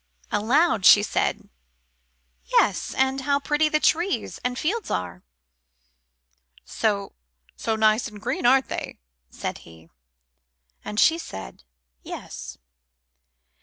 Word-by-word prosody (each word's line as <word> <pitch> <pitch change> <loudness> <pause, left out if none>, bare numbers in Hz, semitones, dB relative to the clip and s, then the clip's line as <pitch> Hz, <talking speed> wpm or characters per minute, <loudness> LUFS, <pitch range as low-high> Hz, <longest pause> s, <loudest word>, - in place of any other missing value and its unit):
Aloud 230 - +2
she 205 +2 +8
said, - - -1 1.0
"Yes, - - +1
and 265 +1 +1
how 280 +1 +1
pretty 295 +2 +1
the 305 - +1
trees 340 +5 0
and 250 0 -2
fields 415 - -2
are 90 0 -3 0.9
" 60 0 -34
"So 205 -3 -1 0.4
so 225 - -2
nice 220 +1 +3
and 210 -2 -11
green, 235 +2 -1
aren't 265 +1 +4
they?" - - -5 0.3
said - - -5
he. 80 0 -17 0.9
And 210 - -4
she 325 +1 +4
said, 95 - -9 0.4
"Yes." - - -8
225 Hz, 115 wpm, -24 LUFS, -, 1.0 s, she